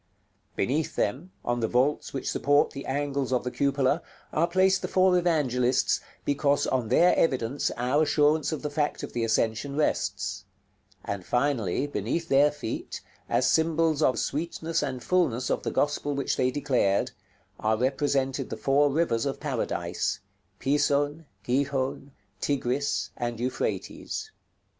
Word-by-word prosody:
Beneath 145 +9 -1
them, 140 - -1
on 120 0 0
the 115 - +1
vaults 130 +6 +1
which 135 - -4
support 145 +1 +2
the 140 -1 -7
angles 140 -1 -1
of 125 - +1
the 125 - -3
cupola, 140 +3 +1 0.3
are 165 +2 +2
placed 190 +2 +3
the - - -2
four 185 -1 +4
Evangelists, 130 -8 +2 0.2
because 145 0 +2
on 125 -4 0
their 170 +10 +5
evidence 130 -3 +1
our 125 +5 +2
assurance 150 0 +3
of 155 - -4
the 150 - -3
fact 150 0 -1
of - - -6
the 120 - -1
ascension 115 +4 0
rests; 95 - -1 0.6
and, 100 -2 -4
finally, 125 -2 0
beneath 145 - -3
their 140 +2 +5
feet, 145 -6 -5 0.3
as - - +2
symbols 160 -1 +2
of 130 - +4
the - - -8
sweetness 165 +2 -2
and 125 -2 -3
fulness 145 -9 +1
of - - 0
the - - -2
Gospel 145 0 0
which 140 - 0
they 125 - +2
declared, 125 -8 +1 0.5
are 110 0 +1
represented 135 +1 0
the - - -5
four 145 +2 +3
rivers 140 -5 +1
of 135 - -3
Paradise, - - -2 0.4
Pison, 145 +2 +1 0.2
Gihon, 135 +2 -1 0.3
Tigris, 140 0 -1
and 120 -1 -3
Euphrates. 130 - -3
140 Hz, 145 wpm, -27 LUFS, 125-150 Hz, 0.6 s, their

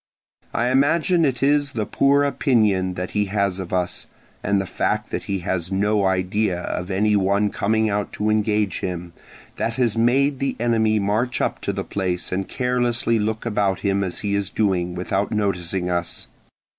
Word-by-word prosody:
I 120 +2 0
imagine 165 +6 +3
it 130 -2 -1
is 145 -1 +2
the 110 -4 -1
poor 140 +4 +3
opinion 105 -10 +2
that 90 0 -4
he 105 0 +1
has 100 -1 0
of 95 -2 -6
us, 90 -1 -2 0.4
and 100 - +2
the 95 - -2
fact - - -2
that - - -3
he 100 -2 -2
has 90 -2 -1
no 100 +1 +1
idea 95 0 0
of 90 +1 -4
any 105 +2 +2
one 100 +1 +2
coming 110 +2 +1
out 105 -1 -1
to 105 +1 0
engage 105 -3 +1
him, 90 -2 -5 0.4
that 115 - -1
has 120 -3 +1
made 135 +4 +2
the 135 -1 -1
enemy 110 -2 +2
march 105 +5 0
up - - -1
to - - -1
the 95 0 -3
place 90 -3 -3
and 95 +1 -2
carelessly 120 -2 0
look 110 +2 -2
about 100 -4 0
him 100 -1 +1
as 90 -2 -3
he 100 -1 -1
is 100 -1 0
doing, 90 -5 0
without 95 +3 -1
noticing 95 -4 -1
us. 85 -1 -2
105 Hz, 180 wpm, -22 LUFS, 95-115 Hz, 0.4 s, imagine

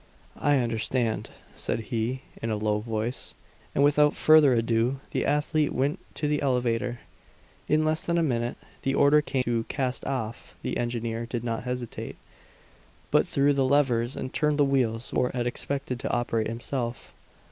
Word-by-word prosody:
"I 145 0 +3
understand," 115 -1 0 0.2
said - - -1
he, 120 +4 -1 0.2
in 115 - -2
a 110 - 0
low 105 0 0
voice; 115 +3 -3 0.4
and 140 - +4
without 150 +1 +4
further 155 -3 +6
ado 115 +3 +1
the - - 0
athlete 150 +1 +1
went 140 +3 0 0.2
to 150 - -1
the 150 0 +1
elevator. 125 -2 0 0.7
In 155 +1 +3
less 155 0 0
than 170 0 +2
a 170 - +3
minute 120 -5 -1 0.2
the 135 0 0
order 145 +2 +5
came 135 -3 -1
to 115 -2 0
"cast 130 -2 -2
off." 115 -4 -4
The - - -2
engineer 115 -1 -2
did 120 -1 -3
not 115 0 -3
hesitate, 125 -2 -4 1.0
but - - +4
threw 140 +1 +3
the 140 -1 +2
levers 130 -3 +2
and 130 - -5
turned 150 -1 +1
the 145 - +5
wheels 125 -4 0
which - - -1
Fort 125 - +1
had 120 -1 0
expected 130 0 -3
to 140 - -3
operate 115 -2 0
himself. 120 +1 -4
125 Hz, 170 wpm, -27 LUFS, 115-140 Hz, 1.0 s, further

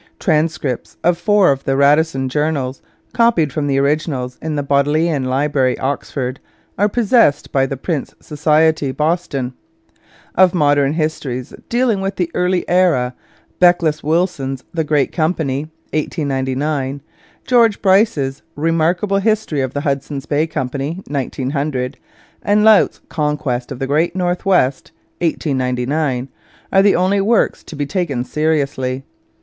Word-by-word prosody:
Transcripts 155 - -1
of 175 0 +3
four 205 -1 +3
of 135 0 -2
the 135 0 0
Radisson 140 -1 +3
Journals 140 -2 -1 0.3
copied 195 - +2
from 150 -2 -1
the 135 -1 +1
originals 140 -3 -1
in 155 -1 -3
the 145 - -1
Bodleian 145 +1 +1
Library, 135 0 +1
Oxford 130 -1 -3 0.4
are 205 +2 +2
possessed 225 - +2
by 135 -1 +2
the 135 - -4
Prince 150 +1 -3
Society, 155 -1 +1
Boston. 150 -4 -1 0.8
Of 185 0 +4
modern 145 -3 +3
histories 150 -6 -3 0.2
dealing 235 -4 +1
with 195 +1 -2
the 175 -2 -2
early 180 0 0
era 170 -9 +2 0.5
Beckles 170 -4 +3
Willson's 150 -5 -1
The 165 -1 0
Great 150 -2 +1
Company 155 -3 -1 0.2
(1899), 140 -2 -2 0.4
George 230 -4 +3
Bryce's 185 -9 +2
Remarkable 165 +6 +1
History 210 -8 0
of 130 0 -3
the 145 - -1
Hudson's 140 -1 -3
Bay 150 +2 0
Company 145 +3 -4
(1900), 140 -1 -2 0.4
and 205 +1 +2
Laut's 220 -2 +4
Conquest 150 -5 -2
of 135 - -5
the 135 - -2
Great 155 +6 +1
North 180 +1 -1
West 140 -7 +1 0.3
(1899) 130 -3 -1 0.5
are 195 - +6
the 200 0 +4
only 190 +3 +2
works 220 +3 +1
to 160 - -10
be 145 0 -2
taken 145 -7 -2
seriously. 140 -3 -1
150 Hz, 130 wpm, -18 LUFS, 135-175 Hz, 0.8 s, are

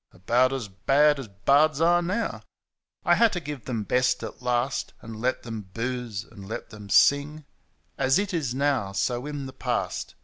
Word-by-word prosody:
About 120 +8 +2
as 130 -5 -3
bad 140 +9 +3
as 130 - -6
bards 140 +10 +3
are 175 +1 +4
now. 200 +7 -2 0.6
I 175 - +5
had 225 +5 +5
to 180 - -1
give 145 -5 -7
them 115 -4 -2
best 125 +3 +1
at - - -7
last. 125 +1 -1
And 110 -1 -8
let 130 +1 0
them 110 -5 -7
booze 120 -3 -3
and 100 -3 -13
let 110 - -6
them 105 -1 -11
sing; 145 +6 +3 0.5
As 135 0 +3
it 200 -1 -1
is 140 -8 -1
now, 135 -8 0
so 120 +6 -1
in 145 -2 -5
the 130 - -8
past. - - -3
130 Hz, 180 wpm, -26 LUFS, 115-150 Hz, 0.6 s, I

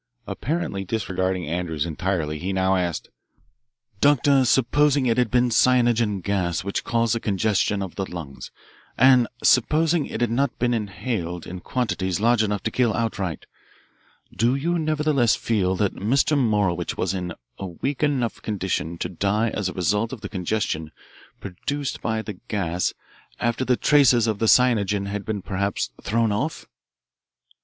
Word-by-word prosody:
Apparently 105 - -3
disregarding 95 -3 -2
Andrews 80 -2 -2
entirely, 80 -2 -2
he 95 +5 -3
now 95 0 +2
asked, 90 -3 -2 0.9
"Doctor, 140 0 +4
supposing 140 +3 +3
it 120 0 +2
had 125 -3 +2
been 125 0 +2
cyanogen 120 -4 +3
gas 90 -4 -1
which 100 +1 -3
caused 115 -1 +1
the 115 - -1
congestion 100 -1 0
of 95 - -7
the 95 -1 -4
lungs, 80 -6 -7 0.5
and 130 -1 +6 0.2
supposing 155 +5 +3
it - - -5
had 120 -2 +1
not 130 +1 0
been 120 0 +1
inhaled 100 -5 -3
in 90 +1 -7
quantities 95 -5 -2
large 115 +1 +3
enough 105 -2 -1
to - - -1
kill 120 -4 +1
outright, 100 -8 -2 0.9
do 120 +3 +2
you 170 +5 0
nevertheless 150 -6 +2
feel 95 -5 0
that 100 +1 0
Mr. 135 +8 +1
Morowitch 105 - 0
was 95 0 -1
in 90 -2 -4 0.2
a 95 - -4
weak 130 - -4
enough 135 -6 0
condition 95 -5 -2
to 85 - -2
die 100 +5 0
as 100 -3 -2
a - - -6
result 105 +6 0
of 130 -5 -7
the - - -6
congestion 90 -5 -2 0.5
produced 140 +9 -4
by 110 -1 -1
the 105 -4 -8
gas 90 -3 -1 0.5
after 120 +2 0
the 125 -1 +2
traces 130 -6 +4
of 110 -3 -1
the 115 - +1
cyanogen 105 -5 +3
had 100 0 -4
been 105 -3 -4
perhaps 95 -11 -2
thrown 115 0 +1
off?" 140 +11 -2
105 Hz, 155 wpm, -23 LUFS, 95-125 Hz, 0.9 s, and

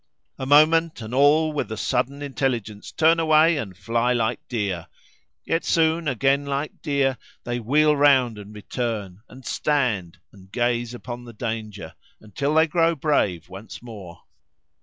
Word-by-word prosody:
A 130 - -4
moment, 155 +2 +4
and 110 +1 -8
all 150 +4 +4
with 145 - -3
a 110 - -4
sudden 135 +5 -1
intelligence 120 -7 -3
turn 165 +1 +3
away 160 0 +4
and 95 -9 -6
fly 115 +5 0
like 115 0 0
deer, 100 -8 -3 0.6
yet 165 - 0
soon 165 0 +1
again 135 +2 +1
like 140 +1 -4
deer 140 -4 0 0.2
they 120 0 -3
wheel 150 +6 +3
round 130 -6 +3
and 105 0 -11
return, 105 -3 -4
and 130 0 -14
stand, 115 - -1
and 95 -1 -18
gaze 120 0 -1
upon 120 0 -8
the 120 - -11
danger, 110 -6 -5 0.3
until 140 +8 -3
they 160 0 +5
grow 165 0 +1
brave 105 - 0
once 95 +6 -10
more. 100 -8 -11
125 Hz, 150 wpm, -23 LUFS, 110-145 Hz, 0.6 s, they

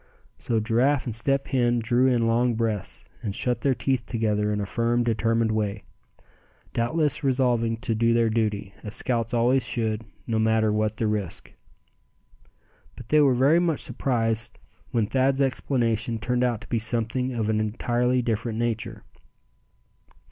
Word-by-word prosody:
So 115 -2 0
Giraffe 125 +6 +1
and 120 - -3
Step 135 +5 0
Hen 120 -2 +2
drew 120 +3 +2
in 120 -3 +2
long 120 +1 +2
breaths, 110 -4 -3 0.2
and 105 -5 -4
shut 125 -1 -1
their 135 -2 +2
teeth 130 -2 0
together 105 -2 0
in 105 - -1
a 100 - -2
firm, 120 +3 0
determined 115 0 +1
way; 105 -1 -2 0.9
doubtless 150 +6 0
resolving 125 -4 +1
to 115 - 0
do 115 +1 +2
their 115 -1 +2
duty, 105 -3 -1
as 105 0 -4
scouts 115 -2 -1
always 125 +2 +2
should, 110 -2 -1 0.2
no 110 -1 -1
matter 110 -1 +2
what 110 +1 0
the 115 - -1
risk. 105 -4 -3 1.4
But 110 - -12
they 150 0 +5
were 135 -3 +4
very 140 +7 +4
much 170 -4 0
surprised 115 -3 -1 0.3
when 115 -4 +1
Thad's 135 +4 +1
explanation 120 -4 0
turned 125 +3 -1
out 120 -3 0
to 110 - -11
be 115 - 0
something 115 +3 -1
of 110 -2 -1
an 110 -1 +1
entirely 120 +3 0
different 115 -1 -2
nature. 115 -2 -3
115 Hz, 155 wpm, -25 LUFS, 110-125 Hz, 1.4 s, they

